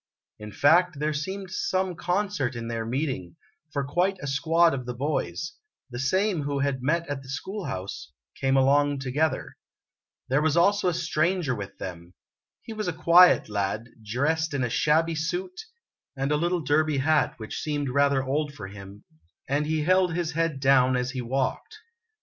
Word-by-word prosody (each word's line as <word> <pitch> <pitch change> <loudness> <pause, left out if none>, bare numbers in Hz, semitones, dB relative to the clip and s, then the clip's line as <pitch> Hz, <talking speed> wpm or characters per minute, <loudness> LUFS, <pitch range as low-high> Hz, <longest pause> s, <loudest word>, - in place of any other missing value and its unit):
In 105 0 -8
fact, 160 - +4
there 150 +1 -1
seemed 190 +5 -4
some 185 0 -1
concert 175 -7 -1
in 115 0 -5
their 115 -1 -3
meeting, 125 - -3 0.4
for 140 -1 -1
quite 180 +7 0
a - - -7
squad 165 +4 +3
of 130 -3 -4
the 125 - -4
boys 150 +4 -2 0.4
the 120 - -5
same 185 +6 +1
who 145 0 -2
had 140 -2 -1
met 165 +6 0
at 145 -1 -4
the 130 - -14
school 190 +8 -5
house 95 +1 -6 0.2
came 135 0 +1
along 145 +2 +3
together. 140 +4 -1 0.7
There 135 +3 +2
was 160 +1 +1
also 200 +3 +3
a 180 - +2
stranger 165 -3 0
with 100 -4 -7
them. 85 -1 -8 0.5
He 225 - -7
was 215 -3 -4
a 175 - -1
quiet 175 +2 +6
lad, 105 +3 -2
dressed 145 +8 0
in 135 - 0
a 120 - -1
shabby 160 +5 +2
suit 360 - -3 0.5
and 135 +2 -1
a - - +3
little 175 +3 0
derby 150 +1 +1
hat 155 +3 +2
which 110 -3 -6
seemed 145 -2 -2
rather 140 0 +2
old 145 +2 -2
for 95 -3 -8
him, 100 0 -11 0.4
and 145 +2 0
he 155 -1 0
held 185 0 +3
his 170 -2 -1
head 165 -3 -1
down 130 -1 +4
as 125 0 -1
he 130 -1 -4
walked. 130 - -2
145 Hz, 175 wpm, -26 LUFS, 130-170 Hz, 0.7 s, quiet